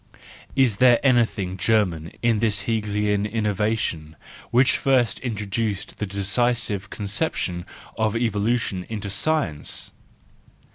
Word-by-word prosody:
Is 130 -7 +3
there 125 -2 +6
anything 115 -8 +2
German 95 -5 +1
in 115 -2 +3
this 105 -2 +1
Hegelian 105 -1 0
innovation 105 -7 -1 0.3
which 125 +2 +4
first 125 -6 +2
introduced 105 -3 -3
the 105 - -2
decisive 105 0 0
conception 100 - -2 0.3
of 110 -1 +1
evolution 110 -3 0
into 105 -3 -4
science? 105 - 0
105 Hz, 100 wpm, -23 LUFS, 100-115 Hz, 0.3 s, there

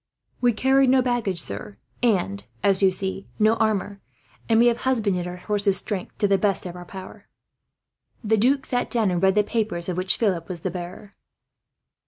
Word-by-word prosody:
"We 245 -1 +4
carried 265 +3 +3
no 260 0 +4
baggage, 235 -8 -1
sir 100 -6 -4 0.2
and, 180 - +1 0.2
as 195 -1 +4
you 195 - +6
see, 190 +1 -4
no 215 +1 +4
armour; 205 -2 0 0.5
and 225 0 +4
we 235 - +6
have 240 -1 +3
husbanded 210 -9 0
our 180 - -6
horses' 200 0 +1
strength, 190 -2 -4
to 205 - +2
the 195 -1 +2
best 200 -3 0
of 175 -1 -6
our 180 0 -9
power." 190 +1 -11 1.0
The 220 0 +2
duke 265 +6 +2
sat 245 -1 -1
down, 220 -5 +1
and 175 -1 -1
read 190 0 +3
the 210 - +4
papers 205 -6 -2
of 180 - -3
which 185 +1 0
Philip 185 -7 0
was 175 -3 -6
the 185 - -2
bearer. 180 +3 -8
200 Hz, 190 wpm, -24 LUFS, 185-225 Hz, 1.0 s, you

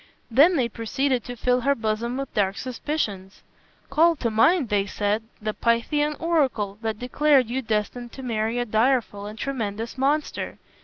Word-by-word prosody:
Then 300 +10 +6
they 255 -6 +2
proceeded 245 +2 -1
to 245 - -6
fill 250 +1 +1
her 280 +2 +2
bosom 230 +2 -2
with 275 0 -5
dark 195 -1 +1
suspicions. 225 -7 -4 0.5
"Call 330 +4 +4
to 235 -6 -2
mind," 255 - +3
they 200 -2 +1
said, 205 +2 0 0.2
"the 215 0 -3
Pythian 295 +7 +1
oracle 260 -12 0
that 220 -1 -2
declared 255 0 +2
you 260 +2 -1
destined 225 +1 -2
to 265 - -8
marry 225 -1 -1
a 245 - 0
direful 220 -2 +1
and 215 +1 -8
tremendous 230 -2 -4
monster. 290 +3 -1
240 Hz, 160 wpm, -24 LUFS, 215-275 Hz, 0.5 s, Then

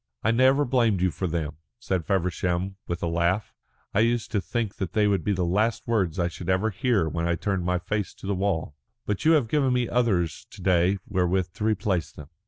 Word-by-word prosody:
I 110 - +3
never 130 +4 +4
blamed 120 -6 +2
you 95 -1 +2
for 95 - -3
them," 80 -3 -3 0.2
said 95 -9 -2
Feversham, 90 0 0
with 85 0 -3
a - - +1
laugh. 85 +5 0 0.4
"I - - +2
used 115 +1 +1
to 105 - +1
think 115 -1 -3
that 90 -3 -4
they 105 -1 +3
would 100 -5 +1
be 105 - 0
the 95 -3 0
last 105 +6 0
words 100 -7 +1
I 85 -2 +1
should 85 +1 -7 0.3
hear 115 -10 +2
when 85 +1 -2
I 85 - +1
turned 95 +1 -2
my 90 0 +1
face 100 +3 -3
to - - -12
the 100 - 0
wall. 90 -6 -1 0.3
But 105 +5 -2
you 160 - +6
have 145 -7 +3
given 135 0 +2
me 125 -1 +1
others 100 -10 0
to 100 - -13
day 90 +1 +3
wherewith 90 -1 +1
to 105 - -6
replace 100 -6 0
them." 75 -1 -12
95 Hz, 215 wpm, -26 LUFS, 85-110 Hz, 0.4 s, you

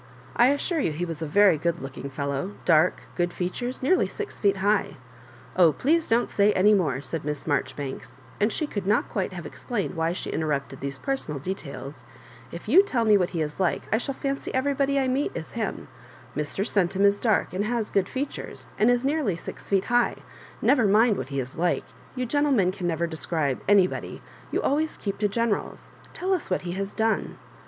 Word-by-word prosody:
I 240 - +6
assure 285 +5 +1
you 170 - +1
he 165 +4 -2
was 165 -2 -6
a 160 - -2
very 190 0 +5
good 170 -2 -1
looking 135 +1 -6
fellow 140 +7 -3
— - - -22
dark, 155 0 +4
good 175 0 0
features, 245 +10 -3
nearly 370 +8 +3
«x 430 -2 -6
feet 200 -1 +2
high—" 205 +2 +1 0.6
0h 165 -4 +5
please 320 +4 +2
don't 230 +2 +2
say 205 +1 +3
any 205 +3 +5
more," 150 -10 +1
said 160 +2 -4
ITiss 150 0 -4
Maijoribanks, 145 -2 -3 0.2
and 210 +2 +2
she 310 - -1
could 205 -9 -4
not 215 +3 +2
quite 195 -2 -1
have 175 -3 -7
ex - - -10
plained 230 -6 -2
why 165 -1 0
she 180 - -4
interrupted 140 -4 -2
these 140 0 -4
personal 160 - -3
de 180 +8 -2
tails; 140 -5 -9 0.5
"if 170 - -8
you 320 - +8
tellme 230 - +3
what 180 - +1
he 165 - -2
is 150 +2 -6
like 185 -2 +1
I 220 - +3
shall 275 +2 -3
fancy 275 0 -3
everybody 275 +1 +1
I 265 -1 +2
meet 275 +8 0
is - - -6
him; - - -3 0.5
Mr. 150 +6 -2
Centum 195 0 +1
is 200 0 +4
dark, 220 -5 +1
and 195 +3 -1
has 230 -1 -1
good 195 -1 +1
features, 270 +2 -5
and 220 - +5
is 245 +1 +2
nearly 280 - +1
six 165 - -9
feet 195 -1 +2
high— 240 0 +1 0.4
never 250 -7 +4
mind 215 +2 +5
what 130 - -5
he 140 -1 -2
is 130 0 -5
like— 175 0 +1 0.3
you 255 -1 -1
gentle 290 +4 +1
men 195 -8 +3
can 185 -2 -4
never 170 0 0
describe 160 -4 -2
anybody; 195 -3 +2 0.3
you - - -1
always 310 +3 0
keep 200 -2 -4
to 210 - +3
generah; 230 0 0 0.4
tell 380 +1 -1
us 365 - -2
what 185 - 0
he 175 - -4
has 195 +2 -3
done." 220 -1 0
195 Hz, 205 wpm, -26 LUFS, 165-245 Hz, 0.6 s, you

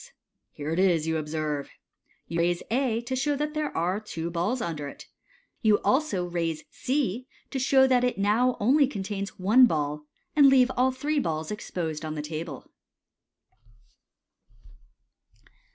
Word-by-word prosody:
Here 150 +1 -5
it 165 - 0
is, 175 -5 +3
you 160 0 0
observe." 150 -2 -3 0.6
Y'ou 170 - -3
raise 175 +1 +1
A 240 -2 +1
to 250 +2 -4
show 285 +3 0
that 300 +1 -2
there 305 -1 -1
are 180 +5 0
two 170 -6 -5
balls 180 +9 -1
under 155 -8 -4
it - - -10 0.6
You 215 -3 +4
also 260 - +1
raise 165 -3 -2
C 255 -3 -2 0.2
to 270 - -2
•how 265 0 +4
that 250 -1 +3
it 250 -4 0
now 220 +6 +2
only 270 +6 +4
contains 200 -4 -5
one 220 +7 +6
ball, 150 -3 -2 0.3
and 290 -2 +7
leave 260 -1 +5
all 255 +1 +3
three 290 +4 -1
balls 160 - -2
exposed 165 -6 -4
on 155 0 -4
the 150 - -4
table. 155 -2 -6
200 Hz, 150 wpm, -27 LUFS, 160-255 Hz, 0.6 s, and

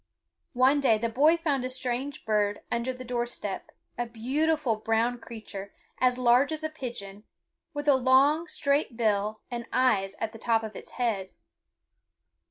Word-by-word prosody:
One 265 +3 +5
day 245 -6 +4
the 230 +2 -1
boy 295 +8 +4
found 290 -6 0
a 255 - -2
strange 255 +2 -3
bird 210 -2 +1
under 235 +2 0
the 255 0 -8
door 240 0 -1
step, 205 -5 -5 0.3
a 240 - -1
beautiful 265 +3 0
brown 225 +3 0
creature, 215 -4 -9 0.2
as 250 -1 +3
large 250 +3 +4
as 315 0 -4
a 315 - -1
pigeon, 210 -8 -7 0.5
with 290 0 -4
a 285 - +7
long, 270 +5 +4
straight 280 -5 0
bill, 215 -1 0
and 235 -1 -4
eyes 200 -7 +2
at 225 - -2
the 225 - -11
top 225 -1 +1
of 220 -1 -6
its - - -10
head. 215 -6 -1
245 Hz, 165 wpm, -28 LUFS, 220-270 Hz, 0.5 s, a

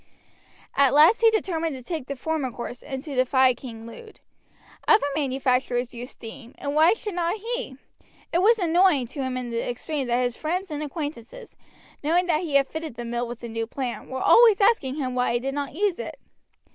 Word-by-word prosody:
At 280 -1 +4
last 315 +10 +6
he 455 - +7
determined 330 -8 -1
to 255 - -9
take 315 -3 -5
the 280 - -4
former 300 0 -2
course 240 +1 -7
and 265 -2 -6
to 295 - -7
defy 255 0 +4
King 230 -3 -10
Lud. 435 - -12 0.7
Other 430 -8 +5
manufacturers 255 -3 0
used 245 +2 -8
steam, 230 +1 -11
and 285 - -4
why 320 +5 +5
should 440 -2 -6
not 345 +1 0
he? 460 - -4 0.6
It 340 - +3
was 455 +4 +5
annoying 350 - +3
to 280 - -5
him 260 -1 -2
in 245 -1 -5
the 230 0 -1
extreme 270 +3 -3
that 245 +1 +1
his 245 -1 -1
friends 355 +3 -3
and 300 0 -3
acquaintances, 305 - -6 0.5
knowing 340 +5 +2
that 330 -3 +1
he 315 -6 -3
had 275 -1 +5
fitted 315 -5 -6
the 240 - -6
mill 240 +1 -2
with 240 0 -8
the 235 - -6
new 225 0 -3
plant, 250 0 -5
were 260 - -4
always 455 -4 +7
asking 395 - +3
him 260 -4 -3
why 250 -1 +1
he 240 - +1
did 270 +2 -3
not 285 0 -4
use 400 0 0
it. - - -6
280 Hz, 205 wpm, -25 LUFS, 250-345 Hz, 0.7 s, he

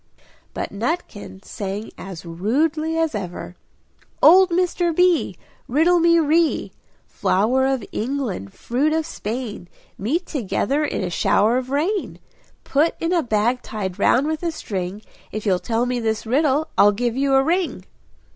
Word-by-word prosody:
But - - -4
Nutkin 205 - -4
sang 200 +2 -5
as 180 -3 -9
rudely 300 - 0
as 325 -3 +1
ever 180 -3 -6 0.6
"Old 370 +4 +7
Mr. 350 -1 0
B! 360 -1 +2 0.3
riddle 330 +7 +3
me 335 0 +5
ree 325 +1 +2 0.3
Flour 250 +8 +1
of 270 -3 -1
England, 230 - -3
fruit 275 - -1
of 320 0 0
Spain, 225 - -5 0.3
Met 305 - -1
together 280 - -1
in 285 - -2
a 180 - -3
shower 220 +7 +2
of 255 0 -7
rain; 340 +9 -1 0.5
Put 300 +4 +1
in 330 +2 0
a 345 - +3
bag 235 0 0
tied 190 -4 -5
round 260 +3 +3
with 310 0 -2
a 340 -1 -1
string, 195 - -5 0.3
If 215 +1 -5
you'll 185 -3 +2
tell 230 +3 -1
me 250 0 -1
this 220 -1 -2
riddle, 290 +5 +1
I'll 205 0 +6
give 240 +2 -1
you 270 0 +2
a 270 - +5
ring!" 345 +3 -1
260 Hz, 150 wpm, -22 LUFS, 210-320 Hz, 0.6 s, Old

